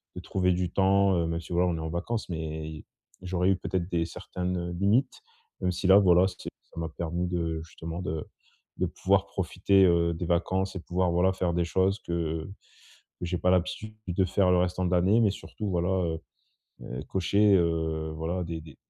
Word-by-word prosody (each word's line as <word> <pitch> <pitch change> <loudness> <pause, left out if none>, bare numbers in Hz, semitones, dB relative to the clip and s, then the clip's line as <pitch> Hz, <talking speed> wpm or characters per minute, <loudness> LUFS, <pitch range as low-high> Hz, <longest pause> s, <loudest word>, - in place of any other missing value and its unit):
de - - -6
trouver 90 -1 +1
du 90 0 -1
temps, 95 0 +3
heu, 85 - +1
même 85 0 -2
si 85 - -13
voilà, 90 +1 +2
on 85 - 0
est - - -5
en 80 0 -4
vacances, 95 +7 -3
mais 80 -2 -4
y 80 -1 -9 0.4
j'aurais 90 0 +1
eu 95 - +4
peut-être 90 -1 -3
des 85 -1 0
certaines 90 0 -4
limites. 110 +7 +2 0.4
Même 90 - 0
si 90 +2 -2
là, 95 - +8
voilà, 95 -2 +5
c'est 90 - -7 0.2
ça - - -8
m'a 80 - -2
permis 85 +2 -3
de 85 -2 -2
justement 80 +1 -7
de 80 -2 -3 0.5
de - - +1
pouvoir 95 +1 +1
profiter, 95 +1 +2
heu, 85 -1 +3
des 85 +2 -4
vacances 95 +3 0
et - - -3
pouvoir 90 +1 0
voilà, 90 +2 +3
faire 90 -2 -1
des 85 -1 +1
choses 95 +4 +1
que 80 -2 -2 0.8
que 90 - -3
j'ai 90 +1 -1
pas 90 - +2
l'habitude 90 +4 0
de 95 +2 +1
faire 95 0 +2
le 90 - +4
restant 90 +1 0
de - - -1
l'année, 95 +6 +4
mais 105 -3 +4
surtout, 105 +1 -6
voilà, 90 -1 0
heu 85 -4 0 0.6
heu, 60 - -6
cocher, 100 +2 +3
heu, 80 -2 0
voilà, 85 +3 -2
des 85 -1 -5
des 75 -3 -13
90 Hz, 205 wpm, -28 LUFS, 85-95 Hz, 0.8 s, là